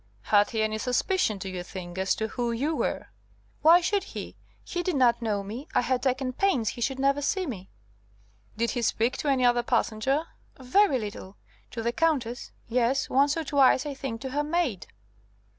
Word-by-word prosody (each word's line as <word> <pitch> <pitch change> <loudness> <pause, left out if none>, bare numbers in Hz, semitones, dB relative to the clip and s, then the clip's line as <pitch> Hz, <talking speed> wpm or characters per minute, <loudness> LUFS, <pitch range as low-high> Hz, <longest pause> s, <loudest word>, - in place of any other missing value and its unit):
"Had 205 - +3
he 220 -1 0
any 215 0 -1
suspicion, 250 - 0
do 195 - -6
you 185 -1 -4
think, 175 0 -8
as 190 0 +1
to 220 0 -3
who 240 0 -2
you 285 +7 -1
were?" - - -2 0.5
"Why 335 +3 +7
should 395 +2 0
he? - - -8 0.3
He 350 - -3
did 355 -2 -1
not 240 -3 +3
know 210 -3 -1
me. 230 +9 -7
I - - +5
had 255 0 0
taken 260 -1 -1
pains 255 - +1
he 240 - -7
should 265 +3 -1
never 275 +1 +2
see 370 +6 0
me." 195 - -7 0.9
"Did 235 +1 0
he 240 - -2
speak 230 +2 +1
to - - -4
any 265 -3 +3
other 240 0 +4
passenger?" 240 +4 0 0.4
"Very 275 +4 +3
little. 205 -3 -7 0.3
To 230 - -5
the 235 - +1
Countess. 265 -6 -1 0.2
Yes, 250 +3 +1
once 280 +3 +3
or 325 - -1
twice, 280 -1 +3
I 290 - -3
think, 265 -4 -5
to 265 -1 -5
her 290 +2 0
maid." 300 - -1
250 Hz, 195 wpm, -27 LUFS, 225-285 Hz, 0.9 s, Why